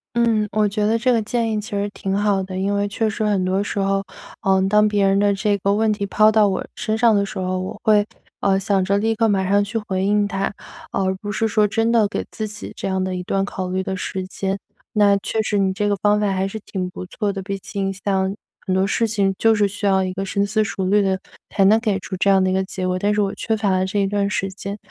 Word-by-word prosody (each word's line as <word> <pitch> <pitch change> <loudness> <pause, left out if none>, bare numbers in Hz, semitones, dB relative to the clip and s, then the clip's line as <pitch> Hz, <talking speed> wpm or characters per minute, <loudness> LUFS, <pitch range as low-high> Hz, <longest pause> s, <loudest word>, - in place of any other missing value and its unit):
嗯， 225 -3 +2
我 215 -1 +2
觉 210 +1 -1
得 220 +2 +2
这 250 +2 +2
个 230 - +2
建 225 +1 -1
议 215 - 0
其 210 - -9
实 205 0 -1
挺 195 -1 -3
好 205 -1 +1
的， 185 0 -5
因 200 +2 0
为 200 0 0
确 220 +2 -1
实 215 0 -2
很 200 -3 +1
多 190 +2 +1
时 205 - -4
候， 195 0 +1 0.4
呃， 190 0 +3
当 210 +1 +4
别 205 -1 +2
人 195 - +3
的 205 0 +3
这 200 +1 +1
个 200 +1 +1
问 215 +1 +2
题 205 -1 -2
抛 215 +2 +4
到 215 -1 +4
我 190 - -2
身 220 -1 -2
上 230 -1 +5
的 200 -1 +2
时 - - -6
候， 185 0 -1
我 185 +3 -6
会， 210 -1 +4 0.4
呃， 195 -1 +2
想 195 -1 +1
着 200 +2 +1
立 225 +2 +1
刻 225 0 +2
马 190 -2 +1
上 205 +1 +4
去 205 +3 -2
回 190 -3 -2
应 205 +1 +2
他， 195 -1 -2 0.4
而 190 0 0
不 205 - -4
是 225 +2 0
说 215 -1 +2
真 225 +2 +1
的 220 -3 +4
给 - - -4
自 215 -1 -4
己 210 +1 -8
这 - - -3
样 190 -1 0
的 185 0 -2
一 180 - -3
段 195 +2 0
考 190 -2 -4
虑 185 +1 -2
的 190 - -3
时 185 0 -4
间， 195 +1 -3 0.4
那 205 -2 +5
确 220 - -2
实 210 -1 0
你 190 -1 +2
这 205 +2 -1
个 205 - +2
方 210 0 +4
法 205 -2 +1
还 190 0 0
是 220 - -6
挺 185 -2 -3
不 185 - -8
错 205 +2 -2
的。 195 - -5
毕 195 +1 -4
竟 195 0 -3
像 190 -1 0 0.3
很 185 - +1
多 190 - +2
事 225 +3 +1
情， 200 -3 +1
就 225 0 +4
是 205 -2 +2
需 205 +1 -4
要 190 -1 +3
一 185 -1 -2
个 195 +1 -3
深 200 +1 0
思 215 +2 +1
熟 190 -2 -3
虑 205 +2 +4
的 190 -1 0 0.3
才 195 - +2
能 210 +3 +6
给 210 -4 -1
出 185 - -6
这 185 +2 +1
样 195 -1 +5
的 185 - +2
一 - - 0
个 190 0 +1
结 185 -1 -5
果， 185 0 0
但 205 +2 +1
是 210 - +1
我 200 -1 0
缺 220 -1 -1
乏 210 -2 0
了 185 0 +1
这 205 +1 -1
一 195 - +1
段 200 0 0
时 195 -1 -1
间， 200 +1 -6
200 Hz, 300 characters per minute, -21 LUFS, 190-210 Hz, 0.4 s, 能